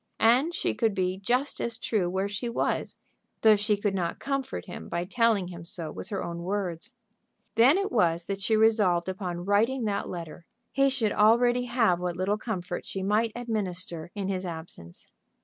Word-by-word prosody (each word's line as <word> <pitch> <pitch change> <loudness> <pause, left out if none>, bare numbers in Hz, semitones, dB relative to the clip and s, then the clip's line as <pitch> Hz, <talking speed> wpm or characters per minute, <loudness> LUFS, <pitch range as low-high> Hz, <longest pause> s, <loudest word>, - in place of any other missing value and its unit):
And 260 +10 +4
she - - 0
could 225 -4 0
be 185 0 -1
just 250 +7 0
as 235 -1 -2
true 195 -6 0
where 190 +2 -1
she 205 +4 -3
was, 235 - -1 0.5
though 220 -1 +8
she 210 0 +1
could 205 -1 -1
not 175 -3 -2
comfort 275 -3 -3
him 180 - -8
by 170 +1 -2
telling 215 -3 +2
him 170 -2 -8
so 165 -2 -6
with - - -8
her 200 - -3
own 170 0 -5
words. 185 +3 -3 0.6
Then 250 +9 +6
it 395 0 -1
was 170 -7 +2
that 195 0 -4
she 220 +3 +2
resolved 210 -6 +3
upon 180 -2 -4
writing 225 +6 +2
that 200 -1 -1
letter. 170 -1 -7 0.2
He 275 0 +3
should 245 -6 0
already 240 +3 +4
have 230 -8 +2
what 180 -1 -3
little 200 +3 0
comfort 180 -6 -4
she 195 - -4
might 215 +3 +2
administer 185 -8 -3
in 200 -2 -3
his 190 -1 -2
absence. 160 - -8
200 Hz, 185 wpm, -27 LUFS, 180-230 Hz, 0.6 s, though